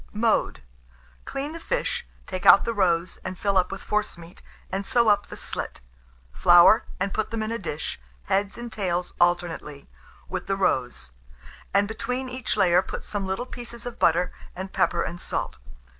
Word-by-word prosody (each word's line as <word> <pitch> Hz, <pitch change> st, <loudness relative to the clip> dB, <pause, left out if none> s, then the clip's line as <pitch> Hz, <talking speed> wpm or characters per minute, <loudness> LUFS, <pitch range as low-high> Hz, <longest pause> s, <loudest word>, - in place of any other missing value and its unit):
Mode. -, -, +1 dB, 0.6 s
Clean 280 Hz, +2 st, -4 dB
the 330 Hz, -, -7 dB
fish, 480 Hz, +7 st, -2 dB, 0.2 s
take 185 Hz, -2 st, -5 dB
out -, -, +8 dB
the 230 Hz, -, -1 dB
roes, 175 Hz, -4 st, +1 dB
and 185 Hz, 0 st, -5 dB
fill 200 Hz, 0 st, 0 dB
up 185 Hz, -1 st, +3 dB
with 195 Hz, -, -6 dB
forcemeat, 175 Hz, -5 st, -3 dB, 0.3 s
and 195 Hz, +1 st, -1 dB
sew 235 Hz, +2 st, +3 dB
up 205 Hz, -, +3 dB
the -, -, -9 dB
slit. -, -, -5 dB, 0.5 s
Flour, 175 Hz, -, +7 dB
and 195 Hz, +1 st, -1 dB
put 220 Hz, -1 st, -1 dB
them 225 Hz, -1 st, -2 dB
in 215 Hz, -, -3 dB
a 230 Hz, -, -2 dB
dish, 150 Hz, -6 st, -4 dB, 0.2 s
heads 200 Hz, +1 st, 0 dB
and 235 Hz, -1 st, -7 dB
tails 180 Hz, -3 st, -2 dB
alternately, 170 Hz, -5 st, 0 dB, 0.4 s
with 185 Hz, -1 st, -4 dB
the 195 Hz, -, +1 dB
roes; 125 Hz, -, 0 dB, 0.6 s
and, 200 Hz, +1 st, +3 dB
between 250 Hz, +4 st, -3 dB
each 255 Hz, -3 st, -2 dB
layer, 180 Hz, -3 st, +5 dB
put -, -, -7 dB
some 200 Hz, -2 st, -3 dB
little 190 Hz, +6 st, -2 dB
pieces 240 Hz, -1 st, -9 dB
of 245 Hz, -, -6 dB
butter, 175 Hz, +2 st, +3 dB, 0.2 s
and 190 Hz, +1 st, -6 dB
pepper -, -, +2 dB
and 175 Hz, 0 st, -5 dB
salt. 65 Hz, -, -3 dB
195 Hz, 175 wpm, -25 LUFS, 175-225 Hz, 0.6 s, out